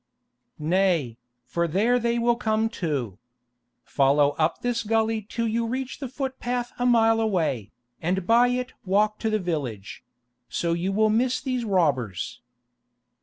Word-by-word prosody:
"Nay, 160 -7 +1 0.3
for 170 +7 -1
there 220 +9 +2
they 235 0 0
will 235 0 +2
come 220 -2 0
too. 140 - -3 0.6
Follow 140 +1 +3
up 155 +1 +1
this 245 -1 0
gully 225 0 +1
till 230 -1 -1
you 230 +1 0
reach 260 +2 -4
the 275 - -4
footpath 250 -2 -3
a 245 - +2
mile 225 -2 +4
away, 160 - -1 0.3
and 180 +2 -1
by 235 +4 +5
it 250 +1 -2
walk 210 +2 +1
to 220 - -1
the 215 - +1
village; 145 - -4 0.5
so 170 -1 -1
you 175 +3 -1
will 215 +2 +3
miss 245 +3 +1
these 255 -3 -2
robbers." 140 - 0
215 Hz, 145 wpm, -25 LUFS, 165-235 Hz, 0.6 s, by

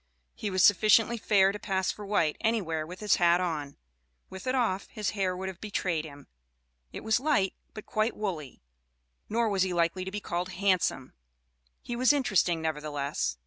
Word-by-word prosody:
He 210 - -4
was 185 -1 +2
sufficiently 215 +4 +5
fair 195 -3 +4
to 205 - -7
pass 190 -2 -1
for 205 -1 -9
white 165 -7 +1
anywhere, 175 -9 -1
with 180 +4 -9
his 210 -2 +3
hat 175 0 +4
on 155 -6 -3 0.5
with 190 +6 -8
it 255 - +1
off, 210 -7 0
his 210 -2 -3
hair 190 -3 -1
would 190 +1 -4
have 190 -2 -8
betrayed 180 -6 -2
him; 145 -2 -12 0.7
it - - -8
was 220 +1 +2
light, 265 -9 +1 0.2
but 215 - -8
quite 215 +2 -1
woolly. 160 - -5 0.7
Nor 230 +1 +1
was 200 -3 0
he 185 -1 +1
likely 170 +2 +1
to 190 - -5
be 205 +2 -4
called 180 -1 -4
handsome; 185 -8 0 0.7
he 240 - -4
was 255 +3 +4
interesting, 190 - +1
nevertheless. 150 - -2
190 Hz, 180 wpm, -28 LUFS, 170-215 Hz, 0.7 s, sufficiently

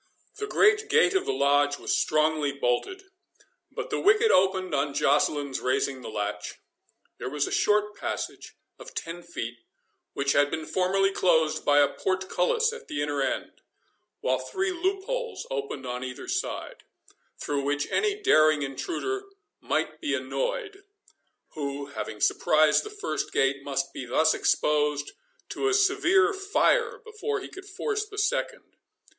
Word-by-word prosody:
The 420 - -3
great 420 +1 +3
gate 455 -5 +4
of 385 +1 0
the - - +2
Lodge 145 - +2
was - - -1
strongly 155 -1 +1
bolted, 140 - -1 0.7
but - - -6
the - - 0
wicket 425 +3 +4
opened 185 -2 +2
on 140 0 0
Joceline's 145 -1 +1
raising 130 +1 0
the - - -7
latch. 105 -1 -4 0.6
There 125 - -4
was 145 +1 0
a - - -6
short 210 0 +2
passage - - -5 0.2
of - - -12
ten 165 +1 -5
feet, 120 -9 -6 0.5
which 140 0 0
had 145 0 +3
been 160 0 -4
formerly 195 +2 +1
closed 160 -5 +2
by 145 0 +4
a 145 -1 +6
portcullis 190 - 0
at 465 - -10
the 145 0 -2
inner 145 -1 -1
end, 135 - -3 0.6
while 130 0 +1
three 375 - -2
loopholes 395 +8 -2
opened 430 - -4
on 125 0 -4
either 125 -1 -7
side, 390 +6 -3 0.6
through 145 -1 -2
which 145 +1 0
any 420 -1 +1
daring 155 - +5
intruder 380 - -3 0.3
might - - -2
be - - 0
annoyed, - - -3 0.7
who, 140 -1 -4
having 105 - -5
surprised 155 +5 +3
the 425 - -7
first 415 0 -4
gate, 135 0 +1
must 135 -1 -2
be 130 - -6
thus 155 +6 +3
exposed 150 -1 +1 0.4
to 405 - -1
a 405 - +3
severe 400 0 +3
fire 450 +5 +1
before 435 -1 -3
he - - -8
could 385 +1 -11
force 420 +1 -2
the 415 -1 -11
second. 430 +4 -2
180 Hz, 150 wpm, -27 LUFS, -, 0.7 s, a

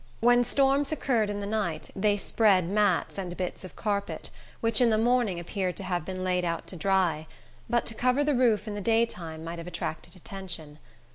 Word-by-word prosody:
When 245 +1 +5
storms 275 +3 +2
occurred 240 -8 +1
in 205 0 -3
the - - -3
night, 200 -7 -2
they 205 +1 +2
spread 195 -4 +3
mats 200 -1 +1
and 180 -2 -5
bits 180 +1 -4
of 185 - -10
carpet, 200 -2 -3 0.3
which 230 +1 +2
in 240 - +5
the 220 - +3
morning 230 -5 +2
appeared 180 +1 -3
to 195 - -5
have 175 -3 -2
been 185 -1 -4
laid 180 -1 +1
out 170 -1 -2
to - - -8
dry; 175 -4 +1 0.4
but 240 0 +2
to - - -2
cover 255 +5 +2
the 295 0 +2
roof 235 -4 +2
in 210 - -3
the 205 - -4
daytime 185 -8 0
might 165 +1 -5
have 170 - -8
attracted 165 0 -5
attention. 175 -5 -6
200 Hz, 200 wpm, -28 LUFS, 180-230 Hz, 0.4 s, When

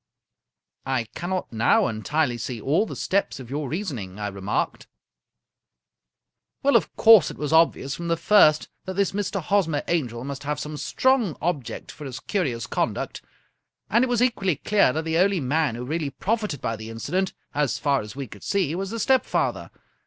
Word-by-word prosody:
" - - -53
I 120 - 0
cannot 180 -5 -3
now 115 +1 +3
entirely 120 +3 -1
see 120 +1 -4
all 155 - +1
the - - -6
steps 200 -7 -1
of 130 -1 -10
your 145 -1 -3
reason 160 - -3
ing," 95 -1 -8
I 105 -1 -3
remarked. 100 +1 -3 0.8
" 60 0 -58
Well, 280 +1 +4
of - - +2
course 220 -7 +7
it - - -9
was 150 +1 -2
obvious 160 -4 +3
from 170 +4 -5
the 165 0 +1
first 155 -6 +5 0.2
that 190 -1 -5
this 200 0 +1
Mr. 200 0 -2
Hosmer 165 -6 +1
Angel 125 -9 -1
must 140 0 -5
have 145 0 -3
some 150 0 -5
strong 255 - +1
object 155 -8 -3
for 150 - -10
his 130 -3 -6
curious 125 - -2
conduct, - - -2 0.7
and 235 +3 +4
it - - +2
was 245 -1 +2
equally 195 -9 +1
clear 205 -2 +3
that 160 +4 -3
the 165 +1 +1
only 195 0 +3
man 145 -1 0
who 120 +1 -5
really 155 +1 -2
profited 210 -1 -2
by 115 - -1
the 110 +1 -8
incident, 180 +12 -2 0.2
as 145 -3 0
far 140 -2 +1
as 105 +2 -9
we 140 0 -4
could 105 -4 -13
see, 185 -7 0
was 190 +2 -3
the 230 +2 -4
stepfather. 265 +2 +1
155 Hz, 190 wpm, -24 LUFS, 125-195 Hz, 0.8 s, course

